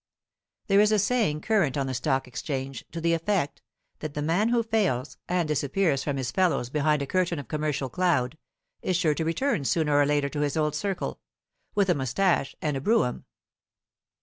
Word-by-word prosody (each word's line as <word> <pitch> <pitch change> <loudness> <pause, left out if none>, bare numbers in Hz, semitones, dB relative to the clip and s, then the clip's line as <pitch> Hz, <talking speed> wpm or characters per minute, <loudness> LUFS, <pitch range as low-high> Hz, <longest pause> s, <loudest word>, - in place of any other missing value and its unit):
There 195 0 +4
is 210 +1 +5
a 215 - +4
saying 205 -7 +1
current 195 - +1
on 135 - 0
the 130 - -3
Stock 135 0 0
Exchange 135 +1 -4
to 165 - -5
the 170 0 +2
effect 165 -2 -1 0.4
that 155 -2 -6
the 150 - -2
man 175 +9 +2
who 235 -1 +2
fails, 200 - -1
and 175 -2 +1
disappears 150 0 +1
from 145 - 0
among - - -3
his 130 -2 -2
fellows 175 -10 +1
behind 150 0 +2
a - - -2
curtain 180 +2 0
of 145 - -6
commercial 150 -3 -1
cloud, 160 -5 +1 0.5
is 185 - 0
sure 165 -4 +2
to 160 - -2
return 170 - 0
sooner 150 +1 +1
or 145 0 +4
later 145 -1 +2
to 145 - -4
his 145 +1 0
old 150 -1 +1
circle, 185 +5 -3 0.6
with 200 -2 +3
a 180 - +4
moustache 140 +2 0
and 150 -2 0
a 135 - -3
brougham. 210 - +1
155 Hz, 195 wpm, -27 LUFS, 140-185 Hz, 0.6 s, is